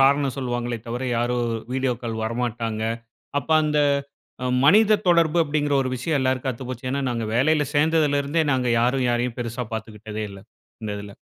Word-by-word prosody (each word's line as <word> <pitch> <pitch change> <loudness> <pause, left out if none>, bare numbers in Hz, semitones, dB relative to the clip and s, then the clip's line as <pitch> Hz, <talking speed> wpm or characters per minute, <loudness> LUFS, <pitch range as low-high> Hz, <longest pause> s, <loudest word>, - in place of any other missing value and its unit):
காரணம் 140 0 +3
சொல்வாங்களே 120 -2 -2
தவிர, 120 +2 -3
யாரும் 120 +1 0 0.3
வீடியோ 130 -1 +1
கால் 115 -2 -3
வரமாட்டாங்க. 115 -1 -2 0.6
அப்ப 160 - -12
அந்த 150 0 +1 0.7
அ - - 0 0.2
மனித 215 +7 +6
தொடர்பு 170 -2 +4
அப்பிடிங்கிற 145 -1 0
ஒரு 130 - -2
விஷயம் 145 +4 0
எல்லாருக்கும் 130 0 0
அத்துப்போச்சு. 130 +1 -6
ஏன்னா, 140 +2 -1
நாங்க 115 -2 -2
வேலையில 150 +4 +3
சேர்ந்ததுலருந்தே 150 0 +2
நாங்க 130 -1 +1
யாரும் 125 +2 +2
யாரையும் 120 0 -1
பெருசா 120 +1 -3
பார்த்துக்கிட்டதே 110 -1 -6
இல்ல. 100 0 -10 0.4
இந்த 110 - -3
இதுல. 100 0 -8
130 Hz, 155 wpm, -23 LUFS, 120-145 Hz, 0.7 s, மனித